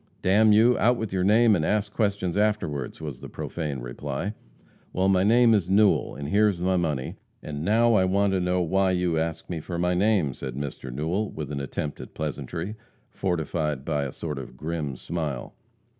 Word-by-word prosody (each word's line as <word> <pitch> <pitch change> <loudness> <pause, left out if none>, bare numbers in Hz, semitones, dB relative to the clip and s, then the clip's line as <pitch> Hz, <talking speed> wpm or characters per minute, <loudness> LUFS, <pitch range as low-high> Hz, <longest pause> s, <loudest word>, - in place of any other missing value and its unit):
"D 95 - +2
n 110 +2 +6
you, 115 +4 +5
out 120 +2 +3
with 110 -4 -4
your 95 -1 +1
name, 110 +2 +5
and 80 - 0
ask 105 +3 0
questions 100 -5 0
afterward!" 100 -11 -1
was 75 -5 -7
the - - -8
profane 75 -6 -4
reply. 70 - -4 0.6
"Well, 95 +1 +1
my 95 -1 +3
name 115 +2 +5
is 95 -5 +1
Newell, 100 +2 +3
and 70 +1 -5
here's 105 -1 +3
my 95 +1 +1
money, 75 -7 -1 0.3
and 75 0 -5
now 115 +5 +4
I 95 -4 +4
want 100 +1 +2
to 95 - +2
know 90 0 +1
why 95 +2 +2
you 90 -3 +1
ask 80 0 -3
me 85 -3 -4
for 85 +2 -5
my 90 +1 +1
name?" 95 -6 +2
said 65 -1 -6
Mr. 70 -2 -5
Newell, 80 - -1
with 75 -2 -6
an 70 - -3
attempt 70 +2 -4
at - - -11
pleasantry, 80 - -4 0.4
fortified 80 -5 -2
by 75 -3 0
a 65 - -4
sort 75 -2 -5
of 65 - -10
grim 75 -4 -3
smile. 75 -3 -4
90 Hz, 195 wpm, -26 LUFS, 75-100 Hz, 0.6 s, n